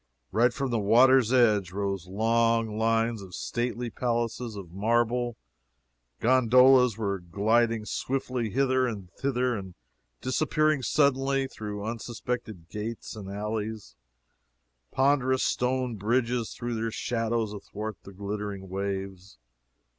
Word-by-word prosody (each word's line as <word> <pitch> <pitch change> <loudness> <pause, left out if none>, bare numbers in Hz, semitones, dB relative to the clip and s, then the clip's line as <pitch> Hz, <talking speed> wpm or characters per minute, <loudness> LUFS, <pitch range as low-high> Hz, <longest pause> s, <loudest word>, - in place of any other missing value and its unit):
Right 120 +4 +3
from 135 +1 -3
the 115 - +1
water's 120 +3 +5
edge 105 -8 +3
rose 100 -2 -3
long 115 +2 +1
lines 115 0 +1
of 95 -2 -9
stately 120 0 -3
palaces 120 -1 -2
of 95 -4 -8
marble; 120 +4 0 0.8
gondolas 125 -1 +5
were 100 -3 -1
gliding 110 +5 +1
swiftly 125 -2 -2
hither 130 +2 +2
and 100 -6 -6
thither 125 +1 0
and 95 -3 -7 0.4
disappearing 155 +3 +1
suddenly 135 0 +2
through 105 -5 -6
unsuspected 115 -4 -5
gates 110 +4 -6
and 100 -3 -8
alleys; 105 +1 -4 1.0
ponderous 130 -1 +2
stone 125 -2 0
bridges 120 +2 0
threw 120 0 -4
their 115 0 -1
shadows 115 -1 -1
athwart 105 +1 -6
the 100 - -12
glittering 100 0 -5
waves. 95 0 -4
115 Hz, 115 wpm, -27 LUFS, 105-125 Hz, 1.0 s, water's